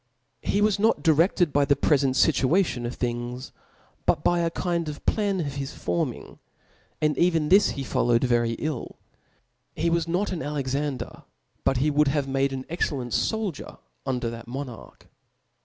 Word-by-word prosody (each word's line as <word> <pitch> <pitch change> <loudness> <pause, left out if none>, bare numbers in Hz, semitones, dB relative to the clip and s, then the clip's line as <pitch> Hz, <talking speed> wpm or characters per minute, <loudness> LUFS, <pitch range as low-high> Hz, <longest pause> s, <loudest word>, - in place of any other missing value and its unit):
He 205 - 0
was 210 -1 +2
not 220 +2 +2
dircfted 165 +1 +3
by 145 0 +3
the 140 0 +3
prefent 140 -2 +2
fifuation 140 -3 +2
of 120 - -5
things, 120 +1 -4 0.6
but - - +2
by 175 - +3
a 170 -1 +1
kind 170 -1 -2
of 150 - -8
plan 205 -3 +1
of 140 -3 -4
his 140 +1 -5
forming; 85 -1 -3 0.6
and 150 -1 +1
even 165 -4 +2
this 200 +2 +6
he 135 - -2
followed 120 -2 +1
very 120 -2 +2
ill. 150 +1 -4 0.8
He 170 0 0
was 170 -1 +1
not 180 +5 0
an 175 -3 -3
Alexander; 140 -2 -3 0.4
but 135 - +2
he 150 +4 +2
would 150 0 +3
have 140 0 0
made 135 0 +1
an 130 -1 -5
excellent 140 -7 -2
foldier 215 -9 -2 0.3
under 125 -3 -2
that 115 0 -9
monarch. 130 -1 -8
145 Hz, 160 wpm, -25 LUFS, 130-170 Hz, 0.8 s, this